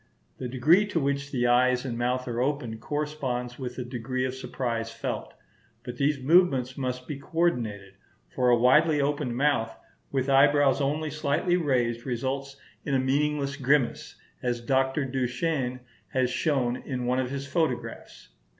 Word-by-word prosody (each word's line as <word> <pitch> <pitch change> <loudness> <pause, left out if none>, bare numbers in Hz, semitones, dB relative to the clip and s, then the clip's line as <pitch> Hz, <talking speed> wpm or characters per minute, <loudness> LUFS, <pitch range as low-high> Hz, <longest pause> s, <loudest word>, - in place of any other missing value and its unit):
The 130 - -3
degree 155 +11 +4
to 175 - 0
which 140 0 -1
the 125 -3 0
eyes 125 +1 +3
and 120 -3 -3
mouth 125 +2 -1
are 120 0 -2
opened 125 -5 -2
corresponds 140 -5 -3
with 125 -2 -5
the 125 - -5
degree 125 +1 -3
of 130 - -2
surprise 115 -3 -3
felt; - - -5 0.5
but 125 -1 -7
these 140 +2 +2
movements 135 -4 +3
must 125 -1 -4
be 145 -2 -5
coordinated; 120 - -1 0.3
for 125 -1 +1
a 120 - +5
widely 150 +6 +4
opened 140 -4 -1
mouth 130 -5 +1 0.3
with 135 -1 0
eyebrows 140 0 +4
only 150 +2 -1
slightly 155 +4 0
raised 125 -8 0
results 135 +3 -3 0.3
in 140 - -1
a - - +3
meaningless 140 +1 0
grimace, 135 -2 +1 0.3
as 120 -1 -1
Dr. 130 +3 +1
Duchenne 130 0 -1 0.3
has 130 -1 0
shown 130 -6 0
in 130 -3 -4
one 125 +1 +1
of 130 -1 -1
his 140 0 -4
photographs. 150 -3 -3
130 Hz, 155 wpm, -27 LUFS, 125-145 Hz, 0.5 s, a